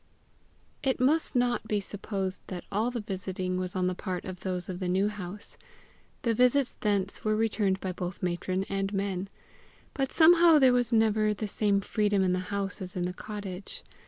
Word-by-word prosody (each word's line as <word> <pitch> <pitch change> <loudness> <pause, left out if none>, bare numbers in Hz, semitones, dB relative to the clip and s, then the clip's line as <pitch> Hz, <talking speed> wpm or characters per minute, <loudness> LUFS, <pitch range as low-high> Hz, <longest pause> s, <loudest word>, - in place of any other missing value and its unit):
It 265 -2 0
must 290 +3 +2
not 245 -2 +1
be 210 -1 +1
supposed 195 -1 -4
that 180 -2 -6
all 215 +4 +1
the 240 -2 -3
visiting 185 -2 -3
was 185 0 -3
on 185 -1 +1
the 180 - +1
part 180 -1 -4
of 185 -1 -6
those 185 -2 -3
of 180 -1 -5
the 185 - -2
New 190 +3 +2
House. 205 -1 -7 0.7
The 230 - +2
visits 250 +3 +3
thence 200 -2 0
were 215 0 +2
returned 210 -3 +1
by 190 - -3
both 180 0 -5
matron 185 +1 -1
and 195 0 -2
men. 195 -1 -2 0.6
But 270 -1 -1
somehow 335 0 +7
there 260 -3 +6
was 245 -1 +2
never 215 -2 +3
the 215 +1 -3
same 200 -1 +2
freedom 205 -1 +1
in 185 -1 +2
the 185 - 0
house 200 -2 -3
as 185 -1 -6
in 180 - -1
the 180 0 -2
cottage. 200 -1 -7
200 Hz, 190 wpm, -29 LUFS, 185-220 Hz, 0.7 s, somehow